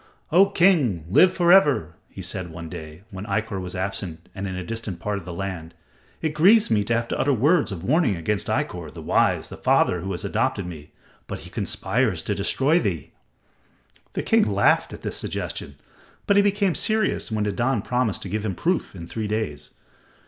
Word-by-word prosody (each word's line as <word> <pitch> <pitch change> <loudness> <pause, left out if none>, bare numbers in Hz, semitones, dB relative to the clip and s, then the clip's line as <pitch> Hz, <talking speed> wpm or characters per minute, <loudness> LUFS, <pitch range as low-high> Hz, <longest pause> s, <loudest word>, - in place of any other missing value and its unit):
"O 185 +5 +6
King, 160 - +3
live 180 - +6
for 175 -2 +3
ever!" 145 - +4 0.2
he - - -9
said 90 -2 -4
one 80 0 -8
day, 80 +3 -9
when 95 +2 -7
Ikkor 100 -1 -2
was 90 0 -6
absent 95 -3 -4
in 100 0 -4
a 95 -1 -4
distant 115 -3 -5
part 105 -1 -2
of 90 - -13
the 90 - -6
land; 85 -2 -5 0.5
"it 155 -2 0
grieves 200 - +5
me 105 -2 +3
to 115 - +1
have 115 0 -1
to - - -2
utter 145 - +2
words 145 +3 +2
of 90 -3 -6
warning 135 - +2
against 100 +5 -2
Ikkor, - - -2
the - - -9
wise, - - +1
the - - -9
father 90 - +2
who 95 +3 -5
has 85 - -5
adopted - - 0
me. 80 -4 -9 0.4
But - - -6
he - - -12
conspires - - 0
to - - -1
destroy 150 +6 +2
thee." 85 - -3 1.0
The - - -2
king 105 - +3
laughed 100 0 +3
at - - -10
this - - -3
suggestion, - - -5 0.5
but 200 - +3
he 200 - +7
became 200 -2 +2
serious 215 - +1
when 110 -1 0
Nadan 115 +2 0
promised 125 -5 0
to 95 - -6
give 105 +2 -2
him 100 -4 -2
proof 175 - -1
in 85 -2 -8
three 110 +5 -4
days. 105 -9 -3
105 Hz, 195 wpm, -24 LUFS, 90-145 Hz, 1.0 s, he